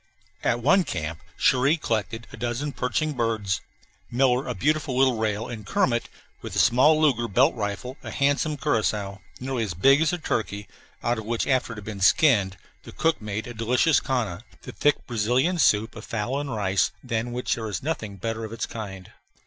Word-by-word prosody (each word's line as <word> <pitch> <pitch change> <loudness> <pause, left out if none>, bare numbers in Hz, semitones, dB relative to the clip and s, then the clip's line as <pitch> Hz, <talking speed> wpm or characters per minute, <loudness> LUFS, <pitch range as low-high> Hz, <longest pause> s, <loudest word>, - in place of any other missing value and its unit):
At 120 - +1
one 180 +8 +5
camp 80 - -4 0.2
Cherrie 135 +5 +3
collected 115 -4 -2
a - - -6
dozen 120 +5 -2
perching 150 +4 -1
birds; 115 -6 -1 0.5
Miller 130 +1 +2
a 125 - -3
beautiful 145 -2 0
little 130 -2 +4
rail; 110 +1 -1
and 115 -3 -7
Kermit, 120 +4 0 0.3
with - - -7
the - - -3
small 145 +6 +5
Luger 130 -7 +2
belt 125 - +3
rifle, 110 +5 -4
a - - -7
handsome 145 +2 +1
curassow, 105 -8 -1 0.2
nearly 130 -1 -2
as 95 -6 -4
big 135 - +5
as 160 - +3
a 175 - -1
turkey 105 - -3 0.4
out 120 -1 0
of 110 - -8
which, 115 +1 -1
after 130 -3 +1
it - - -9
had 105 -2 -9
been 105 -3 -6
skinned, 100 -4 +4 0.2
the - - -11
cook 160 -4 0
made 105 +1 -4
a 120 - -7
delicious 125 +7 +3
canja, 110 -9 -2 0.2
the - - -7
thick 145 - +1
Brazilian 125 +10 +1
soup 110 -4 +3
of - - -8
fowl 120 +5 -2
and 145 -1 -4
rice 100 -3 +1
than 120 -1 -2
which 125 +1 -1
there 110 -2 -4
is 100 - -4
nothing 120 -10 -3
better 115 +4 -3
of 110 - -6
its 115 - -3
kind. 95 -5 -8
120 Hz, 190 wpm, -25 LUFS, 105-135 Hz, 0.5 s, one